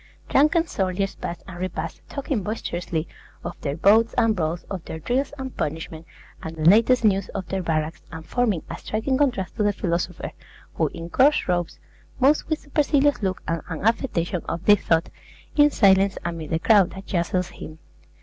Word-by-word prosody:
Drunken 310 +4 +4
soldiers 195 - -1
pass 170 - -6
and 180 -3 -9
repass, 165 -3 -4
talking 275 -5 -2
boisterously 175 -6 -3 0.4
of - - -5
their 145 0 -3
bouts 220 +6 +4
and 225 -1 +3
brawls, 165 -1 -2
of 185 -4 -6
their - - -6
drills 250 - -1
and 265 -1 -6
punishments, 160 +1 -4 0.3
and 160 0 -6
the 155 - -5
latest 230 +7 +5
news 195 -2 +2
of 190 -2 -4
their 190 0 -1
barracks, 155 -2 -2
and 160 -1 -8
forming 215 -5 0
a - - -7
striking 220 +5 -1
contrast 250 -11 0
to - - 0
the 205 0 +3
philosopher, 175 -2 -2 0.4
who, - - +1
in 170 0 -8
coarse 285 +3 +4
robes, 175 -2 -1 0.4
moves 280 +3 +3
with 315 - -1
supercilious 290 -1 +2
look 190 -2 -2
and 165 0 -1
an 165 0 -5
affectation 195 -7 0
of 170 +2 -4
deep 205 -1 +6
thought, 165 +1 +1 0.5
in 295 -1 +6
silence 195 -5 +4
amid 165 -2 -4
the 160 - +1
crowd 200 +1 +4
that 195 0 -10
jostles 180 0 -1
him. 155 - -10
190 Hz, 180 wpm, -24 LUFS, 170-230 Hz, 0.5 s, deep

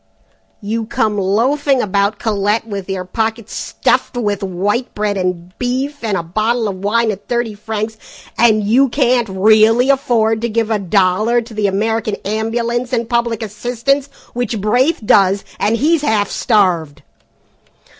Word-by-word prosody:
You 220 +2 -3
come 215 -2 0
loafing 260 +8 +1
about 200 -1 0
Colette 210 0 0
with 200 -3 -6
your 190 -1 -3
pockets 225 +3 -3
stuffed - - -1
with 205 -4 -1
white 200 +6 -2
bread 210 -1 -1
and 180 -1 -3
beef, 260 +3 -2
and 210 -4 0
a 170 - -3
bottle 220 +6 0
of 195 -2 -4
wine 220 +4 +1
at 200 -1 -9
thirty 240 -2 -1
francs 215 +1 -4 0.4
and 220 -3 +3
you 250 +6 +3
can't 245 -3 +1
really 220 +6 +4
afford 225 -5 +1
to 235 - -1
give 225 0 -1
a 215 - +1
dollar 200 +4 +2
to 230 0 -12
the 210 -1 0
American 215 +2 -1
Ambulance 235 +4 -2
and 235 -2 0
Public 235 -1 -1
Assistance, 245 +6 -1 0.3
which 240 -2 -2
Braith 245 - +1
does, 195 -1 +3
and 210 +3 +1
he's 310 +5 +2
half 215 -8 0
starved!" 180 - +1
220 Hz, 150 wpm, -16 LUFS, 200-240 Hz, 0.4 s, really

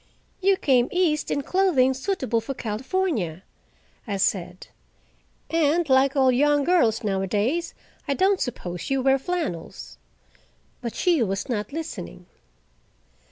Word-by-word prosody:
"You 390 0 +3
came 255 -6 +2
east 340 -4 +1
in 285 - -1
clothing 315 -8 +2
suitable 260 - -1
for 270 +5 -5
California," 220 - -2 0.6
I 200 -2 -2
said, 185 -2 -1 0.9
"and, 325 +1 +2
like 265 +1 +4
all 265 -2 +4
young 290 +3 +3
girls 250 -10 +2
nowadays, 205 - -1 0.3
I 280 - 0
don't 385 +3 +2
suppose 180 -8 -4
you 270 -1 0
wear 270 0 +3
flannels." 305 - -5 0.8
But 235 -2 -5
she 345 -6 +2
was 195 0 -1
not 215 +1 -2
listening. 325 +2 -7
265 Hz, 120 wpm, -24 LUFS, 220-330 Hz, 0.9 s, like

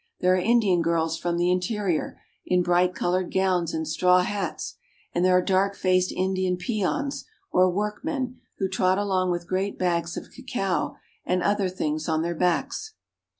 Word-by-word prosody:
There 180 0 +3
are 185 - +3
Indian 205 -4 +3
girls 165 -1 +1
from 170 -1 -1
the 175 +1 +2
interior, 180 -2 -1 0.2
in 180 -1 +2
bright 180 +1 +2
colored 180 +1 0
gowns 185 -3 +1
and 160 -1 -3
straw 180 +4 +4
hats, 195 -2 -4 0.4
and 175 - +1
there 185 0 +5
are 180 - +2
dark 195 +1 +2
faced 185 -1 +2
Indian 185 -1 0
peons, 235 +8 -2 0.3
or 185 0 +4
workmen, 250 - -3 0.2
who 195 - 0
trot 185 0 +2
along 190 -3 +1
with 175 -1 -2
great 190 +2 -1
bags 170 -2 -1
of - - -8
cacao 195 -8 -2 0.3
and 180 0 0
other 205 -2 +1
things 155 -3 -2
on 160 0 +1
their 170 +1 -1
backs. 265 - -1
185 Hz, 165 wpm, -25 LUFS, 175-195 Hz, 0.4 s, there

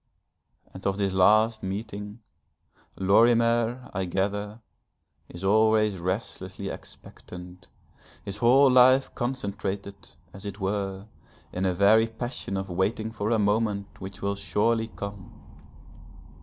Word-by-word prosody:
And 95 - -10
of 95 0 0
this 100 -2 0
last 110 +4 +4
meeting, 105 +2 -6 0.8
Lorimer, 115 +4 +3
I 95 0 -1
gather, 100 +4 -2 0.7
is 85 +2 -10
always 110 0 +3
restlessly 95 +1 -4
expectant, 90 0 -11 0.6
his 100 +1 -5
whole 130 +5 +5
life 130 +1 +5
concentrated, 100 -5 -4 0.4
as 95 - -11
it 100 0 -7
were, 95 0 -3 0.5
in 95 +1 -1
a 90 - +1
very 110 +4 +5
passion 115 -3 -5
of 95 0 -4
waiting 100 +5 -1
for 105 -1 -3
a 115 - +3
moment 105 -1 -1
which 95 0 -8
will 100 0 0
surely 110 +3 0
come. 100 -3 -9
100 Hz, 115 wpm, -26 LUFS, 95-110 Hz, 0.8 s, whole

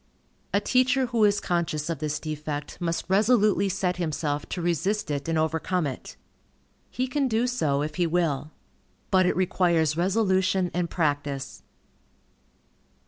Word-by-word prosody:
A 200 - +3
teacher 255 +4 +2
who 235 -3 +1
is 205 0 +3
conscious 165 -5 -1
of 165 -4 -3
this 150 -1 -2
defect, 150 +1 -5
must 170 -1 -1
resolutely 205 0 +3
set 185 -2 -1
himself 150 -3 -2
to - - -4
resist 175 +3 -1
it 145 0 -3
and 165 - +1
overcome 160 +2 0
it. 135 -3 -6 0.7
He 255 - -2
can 275 +1 0
do 230 0 +1
so, 150 - 0
if 155 - -5
he 175 -2 +2
will. 160 -4 0 0.6
But 185 -1 +4
it - - +1
requires 170 -4 +2
resolution 190 0 +1
and 175 -1 -1
practice. 145 -4 -2
175 Hz, 140 wpm, -26 LUFS, 155-200 Hz, 0.7 s, But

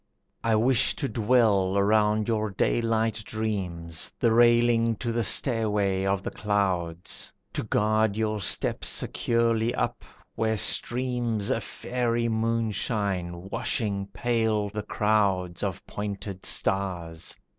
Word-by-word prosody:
I 115 -1 +2
wish 120 +3 +3
to 140 - -2
dwell 105 -6 +2
around 105 +1 +2
your 110 -2 0
daylight 115 +2 0
dreams, 90 -7 -3
The 115 - +3
railing 120 0 +4
to 120 +2 -3
the 115 0 0
stairway 105 -5 +1
of 95 0 0
the - - -4
clouds, 95 -5 -1 0.2
To - - -1
guard 110 0 +1
your 110 -1 -1
steps - - +1
securely 115 0 +1
up, - - -2 0.3
where 110 -1 0
streams 120 -2 0
A - - 0
faery 120 -1 -2
moonshine 105 -5 -1
washing 100 -3 -1
pale 110 -1 0
the 105 +1 -4
crowds 100 -5 0
Of 95 -2 -3
pointed 100 -2 -5
stars. 90 -4 -1
110 Hz, 115 wpm, -26 LUFS, 100-115 Hz, 0.3 s, railing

